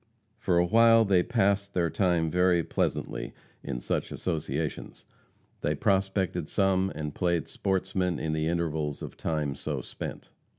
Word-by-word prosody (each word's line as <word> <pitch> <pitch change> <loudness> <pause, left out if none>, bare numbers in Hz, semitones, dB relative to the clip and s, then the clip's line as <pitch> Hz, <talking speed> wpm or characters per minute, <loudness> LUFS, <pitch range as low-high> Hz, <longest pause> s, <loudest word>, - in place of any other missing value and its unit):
For 90 -2 +1
a 85 - +4
while 115 +3 +6
they 95 -3 +4
passed 100 -2 +1
their 85 -2 +1
time 85 -4 +1
very 90 -1 +3
pleasantly - - -2 0.3
in 60 -3 -4
such - - -2
associations. 80 -3 -3 0.6
They - - 0
prospected 95 -4 0
some, 95 -1 +2
and 75 -1 -4
played 85 -3 0
sportsmen 95 -2 -1
in 80 -1 -2
the 80 0 0
intervals 80 -3 -1
of - - -7
time 75 -4 -2
so 70 - -4
spent. - - -8
90 Hz, 140 wpm, -28 LUFS, 80-95 Hz, 0.6 s, while